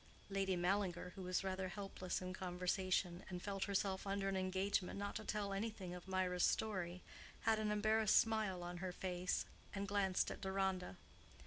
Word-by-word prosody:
Lady 195 -1 +2
Mallinger, 180 0 +1
who 195 - -8
was 185 +1 0
rather 190 0 -1
helpless 185 -1 -3
in 185 0 -3
conversation, 180 0 0
and 180 -1 -5
felt 195 -1 -1
herself 195 -1 0
under 195 0 0
an 195 - +1
engagement 190 0 +1
not 200 0 -2
to - - -3
tell 205 -2 -1
anything 195 -3 -3
of 180 +1 -8
Mirah's 185 -1 +1
story, 185 -5 +1 0.4
had 220 -1 +3
an 215 -1 +1
embarrassed 215 0 +4
smile 215 -5 +2
on 175 0 -4
her 185 +1 -2
face, 180 0 -1 0.3
and 200 0 -1
glanced 195 -2 +2
at - - -6
Deronda. 190 - 0
190 Hz, 170 wpm, -41 LUFS, 180-200 Hz, 0.4 s, embarrassed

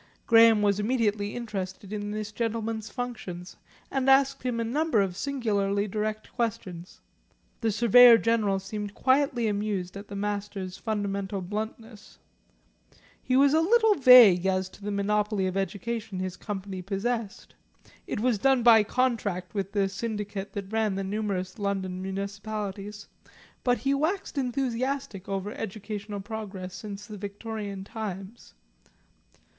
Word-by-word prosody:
Graham 225 -2 +6
was 200 0 +2
immediately 210 -2 0
interested 200 -4 -5
in 205 -1 -3
this 215 0 -4
gentleman's 225 -1 -3
functions, 205 -8 -6 0.4
and 270 -1 +1
asked 270 0 +4
him 245 -2 -2
a - - 0
number 285 +1 +1
of 190 -3 0
singularly 205 -5 0
direct 215 +1 -3
questions. 190 -7 -4 0.6
The 225 -2 +1
Surveyor 235 +2 +8
General 220 -4 +1
seemed 205 +1 -6
quietly 260 -3 +2
amused 200 -3 -2
at 200 +1 -8
the 200 - -8
Master's 200 -2 -3
fundamental 200 -2 -3
bluntness. 215 +3 -6 1.0
He 255 - 0
was 280 +1 +5
a 320 - +4
little 445 +4 +4
vague 245 - +8
as 185 0 0
to 195 - -17
the 205 - -3
monopoly 205 0 0
of 185 0 -2
education 210 +2 -3
his 185 0 -3
Company 195 -2 -5
possessed; 205 +3 -3 0.5
it - - -3
was 235 -2 +1
done 265 +1 +3
by 230 -2 +8
contract 210 -6 -1
with 195 -2 -3
the 200 -2 +1
syndicate 205 -1 -4
that 200 -1 -6
ran 220 -3 +1
the 195 - -2
numerous 195 -1 -3
London 190 -2 -2
Municipalities, 200 +1 -5 0.6
but 245 -1 +3
he 270 +5 0
waxed 320 +8 -1
enthusiastic 255 -5 -2
over 195 +1 -2
educational 210 -1 -5
progress 195 -3 -6
since 205 0 -7
the 210 -1 -9
Victorian 205 -1 -5
times. 200 - -7
210 Hz, 135 wpm, -27 LUFS, 195-230 Hz, 1.0 s, Surveyor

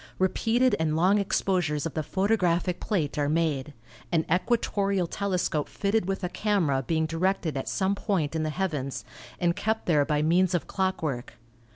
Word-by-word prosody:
Repeated 230 +7 +2
and 155 -1 +1
long 185 +5 +4
exposures 180 -6 0
of 165 - -3
the 155 - -1
photographic 180 -1 +1
plate 155 -9 -1
are 145 0 +1
made, 150 -3 0 0.4
an 165 -2 +2
equatorial 200 -2 +1
telescope 180 -5 -1
fitted 200 -1 0
with 195 0 -2
a 180 - -1
camera 180 -11 +1
being 160 +4 0
directed 165 -1 -1
at 135 - -3
some 190 0 +1
point 185 -7 -1
in 160 - 0
the 155 - -1
heavens, 150 -6 -3 0.3
and 175 -1 +2
kept 220 +1 -1
there 150 -4 +3
by 150 0 0
means 175 +3 +3
of 175 - -1
clockwork. 160 -10 -2
175 Hz, 165 wpm, -27 LUFS, 155-195 Hz, 0.4 s, long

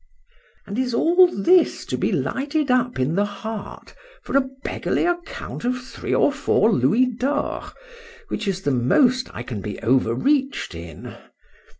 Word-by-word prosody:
— - - -35
—And 205 +3 -4
is 250 -2 -1
all 355 +8 +5
this 350 - +2
to - - -3
be - - 0
lighted 285 +1 -1
up 250 -1 +1
in 130 +5 +1
the 200 +4 +2
heart 205 +1 -7 0.3
for - - -5
a 275 - +6 0.2
beggarly - - -1
account 350 -7 -4
of 250 +1 0
three 250 +1 -7
or - - +4
four 225 - +2
louis 195 - +3
d'ors, 255 +4 -2 0.6
which 215 - -3
is 190 -1 -2
the 145 - +1
most 245 - +2
I 120 - -6
can 115 -5 -6
be 105 +1 -6
overreached 135 - +1
in? 85 -2 -9
240 Hz, 160 wpm, -22 LUFS, -, 0.6 s, a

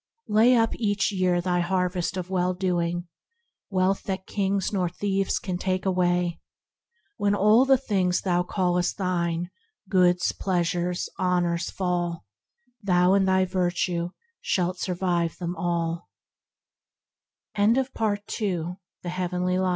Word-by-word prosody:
"Lay 225 +4 +5
up 225 -1 +2
each 205 -3 +1
year 185 -2 +1
Thy 175 0 0
harvest 180 0 -1
of 180 -1 -4
well 180 -1 +1
doing, 175 -1 -1 0.6
wealth 190 0 +1
that 190 -1 -3
kings 195 0 -1
Nor 180 -3 +1
thieves 195 +2 -1
can 180 -2 -4
take 185 0 -1
away. 180 -2 +1 0.8
When 205 0 +2
all 215 +5 +5
the 270 0 +5
things 190 -8 0
Thou 175 -2 +1
callest 180 -1 0
thine, 175 -2 -1 0.4
goods, 180 -2 +3
pleasures, 175 -1 -1
honors 175 -2 +1
fall, 175 - -2 0.6
Thou 180 -2 +3
in 195 -1 +4
thy 190 0 +3
virtue 175 -1 -1 0.3
shalt 180 0 0
survive 175 -2 -1
them 175 -1 -3
T 175 - -11
all." 170 -1 -2
180 Hz, 110 wpm, -25 LUFS, 175-190 Hz, 0.8 s, Lay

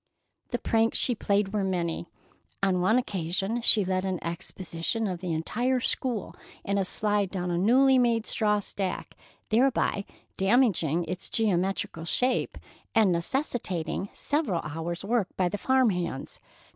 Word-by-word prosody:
The 245 - -1
pranks 225 -1 +1
she 250 - +2
played 200 -2 0
were 210 -2 +1
many. 170 -3 -2 0.6
On 185 -2 +2
one 220 +6 +4
occasion 195 0 -1
she 215 -3 +4
led 185 0 0
an 190 -1 -1
expedition 170 +4 -3
of 185 -4 -3
the 180 -1 -3
entire 240 +11 0
school 245 -3 -2 0.3
in 200 0 0
a 195 - +1
slide 205 0 0
down 180 -2 -3
a 170 - 0
newly 260 +6 +5
made 235 -2 +2
straw 210 -2 +1
stack, 195 -1 -4 0.3
thereby 230 -3 +2 0.3
damaging 190 - +2
its 180 +2 -5
geometrical 190 -5 0
shape 250 +9 0 0.4
and 215 -4 +5
necessitating 180 - -1
several 285 - -1
hours' 165 +4 -4
work 225 -2 +1
by 185 - +2
the 205 +3 -3
farmhands. 190 - 0
195 Hz, 140 wpm, -27 LUFS, 175-230 Hz, 0.6 s, newly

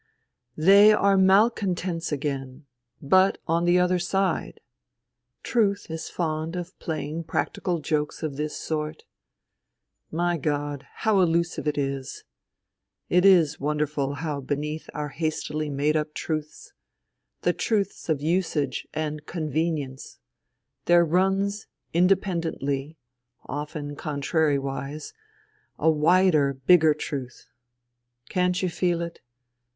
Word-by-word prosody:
" 125 - -58
They 200 +6 +7
are 200 -2 +4
malcontents 190 -4 +2
again 140 -1 -4 0.2
— 120 0 -48 0.2
but 190 +1 +3
on 170 +1 +1
the 175 +1 +4
other 180 0 +2
side! 190 0 -1 0.8
Truth 200 -7 0
is 160 0 -5
fond 160 0 -2
of 180 +1 -6
playing 160 0 -4
practical 175 +2 -1
jokes 150 +1 -2
of 150 -3 -3
this 150 +1 -3
sort. 155 -1 -4 1.1
My 175 +1 0
God! 145 -1 -2
how 215 -3 +1
elusive 170 -2 +1
it 150 - 0
is. 135 -1 -3 0.9
It 180 +2 +4
is 170 -6 +5
won 150 +2 -1
derful 145 -2 -1
how 150 -1 -3
beneath 150 +3 -4
our 150 0 -3
hastily 155 0 -3
made 145 +2 0
up 150 0 -2
truths, 155 -1 -5 0.7
the - - +2
truths 205 -6 -1
of 150 -3 +1
usage 160 -5 -1
and 155 -1 -3
convenience, 155 -4 -3 0.7
there 175 0 +5
runs 195 +4 +1 0.3
independently, 165 -5 0 0.5
often 145 0 -5
contrariwise, 145 - -2 0.6
a 160 +2 +3
wider, 155 -2 +3
bigger 155 +3 +5
truth. 135 -4 -6 0.8
Can't 180 0 +1
you 185 - +1
feel 175 -1 0
it 170 0 -8
155 Hz, 115 wpm, -25 LUFS, 145-180 Hz, 1.1 s, They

